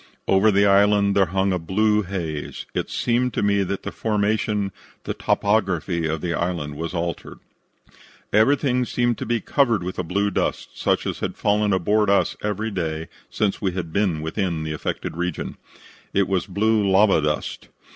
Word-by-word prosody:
Over 95 Hz, +3 st, +4 dB
the 100 Hz, 0 st, +4 dB
island 100 Hz, 0 st, +4 dB
there 95 Hz, -2 st, +4 dB
hung 95 Hz, +2 st, +1 dB
a 90 Hz, -, 0 dB
blue 105 Hz, +5 st, +2 dB
haze. 85 Hz, -6 st, -5 dB
It -, -, -2 dB
seemed 125 Hz, +1 st, 0 dB
to -, -, 0 dB
me 100 Hz, 0 st, +3 dB
that 100 Hz, 0 st, -3 dB
the -, -, -4 dB
formation, 105 Hz, -1 st, 0 dB, 0.3 s
the -, -, -3 dB
topography, 95 Hz, -5 st, 0 dB
of 80 Hz, -1 st, -2 dB
the 85 Hz, -1 st, -1 dB
island 85 Hz, -4 st, -2 dB
was 85 Hz, +3 st, -4 dB
altered. 85 Hz, 0 st, -4 dB, 1.0 s
"Everything 125 Hz, +3 st, +3 dB
seemed 120 Hz, -1 st, 0 dB
to -, -, -4 dB
be 120 Hz, 0 st, +1 dB
covered 115 Hz, -6 st, +1 dB
with 90 Hz, +1 st, -5 dB
a -, -, 0 dB
blue 100 Hz, +4 st, 0 dB
dust, -, -, -1 dB
such -, -, 0 dB
as -, -, -3 dB
had -, -, -4 dB
fallen 105 Hz, 0 st, +2 dB
aboard 105 Hz, +3 st, +2 dB
us 100 Hz, -, +2 dB
every 105 Hz, +2 st, -2 dB
day 80 Hz, -4 st, -3 dB, 0.2 s
since 105 Hz, 0 st, -1 dB
we 95 Hz, -4 st, 0 dB
had 85 Hz, -3 st, -5 dB
been 95 Hz, -6 st, +1 dB
within 85 Hz, -1 st, -2 dB
the 80 Hz, 0 st, -3 dB
affected 75 Hz, -, -4 dB
region. 90 Hz, -1 st, -3 dB, 0.6 s
It 100 Hz, -1 st, +3 dB
was 95 Hz, -2 st, 0 dB
blue 105 Hz, +3 st, +2 dB
lava 95 Hz, -3 st, +5 dB
dust. 75 Hz, 0 st, -2 dB
100 Hz, 175 wpm, -23 LUFS, 85-105 Hz, 1.0 s, lava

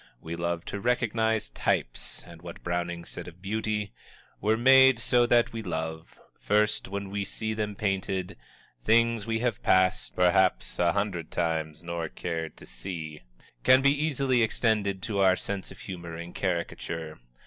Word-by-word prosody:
We 80 Hz, +4 st, -6 dB
love 85 Hz, 0 st, -2 dB
to 100 Hz, -, -4 dB
recognize 110 Hz, -, +1 dB
types; -, -, -2 dB
and 85 Hz, -1 st, -13 dB
what 85 Hz, -1 st, -10 dB
Browning 85 Hz, -1 st, -2 dB
said 85 Hz, -, -8 dB
of 90 Hz, +1 st, -11 dB
beauty: 105 Hz, +1 st, -2 dB, 0.5 s
We're 110 Hz, +2 st, +2 dB
made 130 Hz, +1 st, +7 dB
so 120 Hz, +1 st, +3 dB
that 120 Hz, -1 st, +3 dB
we 115 Hz, -, -4 dB
love 80 Hz, -4 st, -5 dB, 0.2 s
First, 105 Hz, +1 st, +1 dB
when 100 Hz, 0 st, -5 dB
we 100 Hz, 0 st, -1 dB
see 110 Hz, +2 st, -4 dB
them 105 Hz, -1 st, -3 dB
painted, 95 Hz, -3 st, -2 dB, 0.5 s
Things 115 Hz, -, +3 dB
we 115 Hz, 0 st, 0 dB
have 120 Hz, -4 st, -1 dB
passed 95 Hz, 0 st, +2 dB
Perhaps 90 Hz, +1 st, +2 dB
a 85 Hz, -1 st, +3 dB
hundred 95 Hz, -5 st, -2 dB
times 80 Hz, -2 st, -2 dB
nor 85 Hz, -2 st, -3 dB
cared 80 Hz, -2 st, -4 dB
to -, -, -13 dB
see 80 Hz, -5 st, -7 dB, 0.4 s
can 130 Hz, +1 st, +6 dB
be 140 Hz, -, +6 dB
easily 140 Hz, -4 st, +1 dB
extended 105 Hz, -4 st, +1 dB
to 105 Hz, -3 st, -1 dB
our 95 Hz, -1 st, +5 dB
sense 100 Hz, 0 st, -5 dB
of -, -, -12 dB
humor 85 Hz, -4 st, -7 dB
in 85 Hz, +1 st, -8 dB
caricature. 80 Hz, -3 st, -3 dB
95 Hz, 160 wpm, -28 LUFS, 85-110 Hz, 0.5 s, made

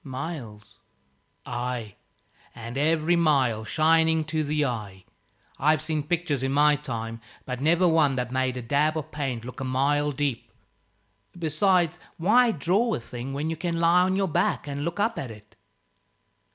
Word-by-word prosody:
"Miles." 130 Hz, -7 st, -7 dB, 0.7 s
"Ay, 120 Hz, -3 st, -4 dB, 0.6 s
and 115 Hz, +1 st, -8 dB
every 160 Hz, +4 st, +2 dB
mile 135 Hz, -9 st, +2 dB
shining 160 Hz, +6 st, +3 dB
to 155 Hz, 0 st, -2 dB
the 150 Hz, 0 st, 0 dB
eye. 105 Hz, -7 st, -5 dB, 0.5 s
I've 155 Hz, +2 st, +3 dB
seen 155 Hz, -1 st, -1 dB
pictures 160 Hz, -2 st, -1 dB
in 135 Hz, 0 st, -1 dB
my 150 Hz, +1 st, +4 dB
time, 115 Hz, -5 st, -5 dB, 0.2 s
but 125 Hz, 0 st, -5 dB
never 170 Hz, +4 st, +3 dB
one 155 Hz, -5 st, +3 dB
that 125 Hz, -1 st, -3 dB
made 130 Hz, -1 st, 0 dB
a 125 Hz, -, -5 dB
dab 150 Hz, +6 st, +1 dB
of 155 Hz, -, -5 dB
paint 130 Hz, -6 st, -3 dB
look 125 Hz, -1 st, -8 dB
a -, -, -3 dB
mile 140 Hz, +3 st, +1 dB
deep. 140 Hz, -3 st, -3 dB, 0.9 s
Besides, 175 Hz, +1 st, +1 dB, 0.2 s
why 235 Hz, +8 st, +4 dB
draw 205 Hz, +7 st, +1 dB
a -, -, -4 dB
thing 120 Hz, +3 st, -7 dB
when 150 Hz, +3 st, -2 dB
you -, -, -2 dB
can 170 Hz, 0 st, -2 dB
lie 170 Hz, +2 st, +5 dB
on 185 Hz, +1 st, +2 dB
your 195 Hz, 0 st, +1 dB
back 160 Hz, -, 0 dB
and 140 Hz, 0 st, -4 dB
look 170 Hz, +5 st, -3 dB
up 225 Hz, +3 st, 0 dB
at 135 Hz, -, -5 dB
it?" 105 Hz, -1 st, -14 dB
145 Hz, 165 wpm, -26 LUFS, 125-165 Hz, 0.9 s, lie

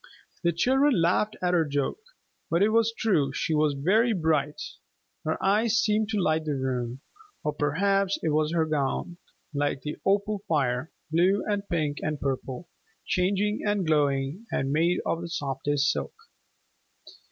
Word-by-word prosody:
The 170 Hz, -, +3 dB
children 260 Hz, -, +3 dB
laughed 180 Hz, +5 st, +1 dB
at 180 Hz, 0 st, +2 dB
her 170 Hz, -2 st, +4 dB
joke. 145 Hz, -, -2 dB, 0.5 s
But 170 Hz, +3 st, +3 dB
it 210 Hz, -, +4 dB
was 230 Hz, 0 st, +3 dB
true, 185 Hz, -12 st, +1 dB
she 160 Hz, -, -1 dB
was 150 Hz, -1 st, +2 dB
very 215 Hz, -, +3 dB
bright. 155 Hz, -5 st, 0 dB, 0.7 s
Her 155 Hz, -, 0 dB
eyes 215 Hz, +3 st, +3 dB
seemed 215 Hz, -1 st, +2 dB
to 215 Hz, -2 st, 0 dB
light 155 Hz, -3 st, +1 dB
the 150 Hz, -2 st, -1 dB
room, 130 Hz, -1 st, -3 dB, 0.4 s
or 150 Hz, -, -1 dB
perhaps 195 Hz, +7 st, +1 dB
it 160 Hz, -, +1 dB
was 155 Hz, 0 st, +1 dB
her 165 Hz, -1 st, +2 dB
gown, 155 Hz, +3 st, -2 dB, 0.4 s
like 145 Hz, -1 st, -1 dB
an 150 Hz, -, -4 dB
opal 200 Hz, +1 st, +1 dB
fire, 135 Hz, -2 st, 0 dB, 0.2 s
blue 185 Hz, +5 st, +3 dB
and 205 Hz, -1 st, 0 dB
pink 155 Hz, -5 st, -1 dB
and 155 Hz, -1 st, -2 dB
purple, 135 Hz, +3 st, -3 dB, 0.4 s
changing 200 Hz, +3 st, +1 dB
and 205 Hz, -3 st, 0 dB
glowing, 145 Hz, +5 st, 0 dB
and 135 Hz, 0 st, -1 dB
made 170 Hz, +3 st, +2 dB
of 165 Hz, -, -1 dB
the 170 Hz, -, -6 dB
softest 145 Hz, -1 st, 0 dB
silk. -, -, -4 dB
165 Hz, 155 wpm, -27 LUFS, 145-200 Hz, 0.7 s, her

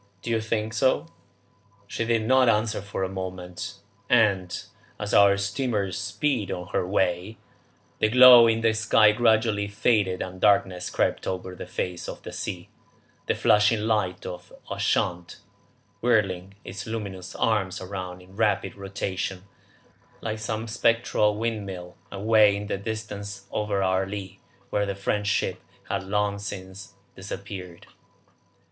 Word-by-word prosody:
Don't 115 Hz, -, -3 dB
you 115 Hz, -1 st, +1 dB
think 110 Hz, 0 st, -2 dB
so?" 130 Hz, +6 st, +2 dB, 0.8 s
She 115 Hz, +3 st, -3 dB
did 115 Hz, -1 st, +1 dB
not 130 Hz, 0 st, +5 dB
answer 110 Hz, -1 st, +1 dB
for 100 Hz, -1 st, -4 dB
a -, -, 0 dB
moment, 95 Hz, +1 st, -6 dB, 0.3 s
and, 100 Hz, -7 st, +2 dB, 0.4 s
as 105 Hz, 0 st, -4 dB
our 100 Hz, -1 st, +6 dB
steamer 100 Hz, 0 st, -1 dB
speeded 105 Hz, -, -1 dB
on 90 Hz, 0 st, -5 dB
her 90 Hz, -, -1 dB
way, 95 Hz, +2 st, 0 dB, 0.6 s
the 110 Hz, -, +3 dB
glow 125 Hz, -1 st, +9 dB
in 115 Hz, 0 st, +2 dB
the 115 Hz, -1 st, +3 dB
sky 110 Hz, -1 st, +5 dB
gradually 110 Hz, -2 st, +2 dB
faded 100 Hz, -2 st, +1 dB
and 95 Hz, 0 st, -9 dB
darkness 95 Hz, -3 st, +3 dB
crept -, -, 0 dB
over 95 Hz, 0 st, -4 dB
the -, -, -8 dB
face 90 Hz, -1 st, -4 dB
of -, -, -8 dB
the -, -, -7 dB
sea, -, -, -5 dB, 0.6 s
the -, -, +1 dB
flashing 105 Hz, -1 st, +4 dB
light 105 Hz, -5 st, 0 dB
of 90 Hz, -1 st, -8 dB, 0.2 s
Ushant 85 Hz, -1 st, -1 dB, 0.6 s
whirling 100 Hz, -5 st, +1 dB
its 100 Hz, +2 st, -7 dB
luminous 100 Hz, -5 st, -5 dB
arms 100 Hz, -4 st, 0 dB
round 90 Hz, -1 st, -6 dB
in 95 Hz, +1 st, -18 dB
rapid 105 Hz, -1 st, +1 dB
rotation, 95 Hz, -1 st, -4 dB, 0.8 s
like 110 Hz, -1 st, -4 dB
some 110 Hz, 0 st, -3 dB
spectral 115 Hz, -2 st, +2 dB
windmill, 100 Hz, -6 st, -4 dB, 0.2 s
away 105 Hz, 0 st, +4 dB
in 100 Hz, +1 st, -4 dB
the 100 Hz, -, -2 dB
distance 105 Hz, -1 st, -6 dB
over 105 Hz, -2 st, -1 dB
our 95 Hz, 0 st, +1 dB
lee, 100 Hz, -1 st, -7 dB, 0.3 s
where 105 Hz, -1 st, +1 dB
the 100 Hz, -, -2 dB
French 100 Hz, +1 st, -1 dB
ship 105 Hz, -, 0 dB, 0.3 s
had -, -, -1 dB
long 100 Hz, +1 st, 0 dB
since 100 Hz, 0 st, -8 dB, 0.2 s
disappeared. 95 Hz, -2 st, -8 dB
100 Hz, 140 wpm, -26 LUFS, 95-110 Hz, 0.8 s, glow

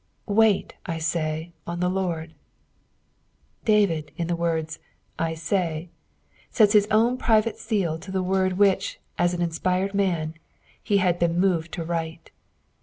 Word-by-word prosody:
" -, -, -43 dB
Wait, 215 Hz, -1 st, +3 dB
I 165 Hz, -, -2 dB
»ay, 160 Hz, 0 st, -2 dB, 0.2 s
ontheLord." 175 Hz, -2 st, -2 dB, 1.3 s
David, 175 Hz, -9 st, +2 dB
in 170 Hz, -, -1 dB
the 170 Hz, +1 st, -1 dB
words 160 Hz, -2 st, -2 dB, 0.4 s
^'Itay," 165 Hz, 0 st, -1 dB, 0.6 s
seta 215 Hz, -4 st, +4 dB
hia 205 Hz, -, -3 dB
own 230 Hz, +3 st, +3 dB
private 225 Hz, 0 st, +2 dB
seal 190 Hz, -8 st, -1 dB
to 190 Hz, +4 st, -11 dB
the 190 Hz, -1 st, -1 dB
word 185 Hz, 0 st, +1 dB
which, 195 Hz, 0 st, +2 dB, 0.2 s
aa 175 Hz, -, +4 dB
an 175 Hz, -1 st, -1 dB
inspired 180 Hz, +3 st, 0 dB
mnn, 175 Hz, -6 st, 0 dB, 0.6 s
ho 205 Hz, -, +5 dB
had 180 Hz, -2 st, +2 dB
been 170 Hz, 0 st, +1 dB
moved 175 Hz, -3 st, +1 dB
to 170 Hz, -, -3 dB
write. 165 Hz, 0 st, -4 dB
175 Hz, 135 wpm, -25 LUFS, 165-195 Hz, 1.3 s, ho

